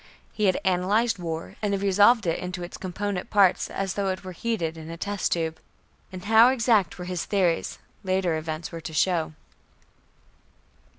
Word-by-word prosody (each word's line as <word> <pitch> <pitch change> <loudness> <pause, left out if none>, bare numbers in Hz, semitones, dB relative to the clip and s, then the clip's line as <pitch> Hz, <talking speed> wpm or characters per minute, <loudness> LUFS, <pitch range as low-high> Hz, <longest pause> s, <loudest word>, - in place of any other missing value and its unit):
He 210 - 0
had 185 -2 +2
analyzed 195 +5 +2
war 165 -1 -5
and 200 -2 0
resolved 205 +3 +4
it 165 - 0
into 180 0 -5
its 175 - -7
component 195 0 -4
parts, 200 -3 +3
as 195 -1 -3
though 200 -1 -1
it 185 +1 -3
were 185 - -7
heated 175 -4 -2
in 160 0 -9
a 165 - -7
test 200 +2 -2
tube. 165 -1 -2 0.5
And 185 0 -8
how 225 +3 +7
exact 225 -9 +2
were 180 - -6
his 180 -1 -3
theories, 185 -5 0 0.3
later 185 -3 +1
events 155 +1 -4
were 165 - -7
to 160 - -7
show. 165 -1 +1
185 Hz, 170 wpm, -25 LUFS, 170-205 Hz, 0.5 s, how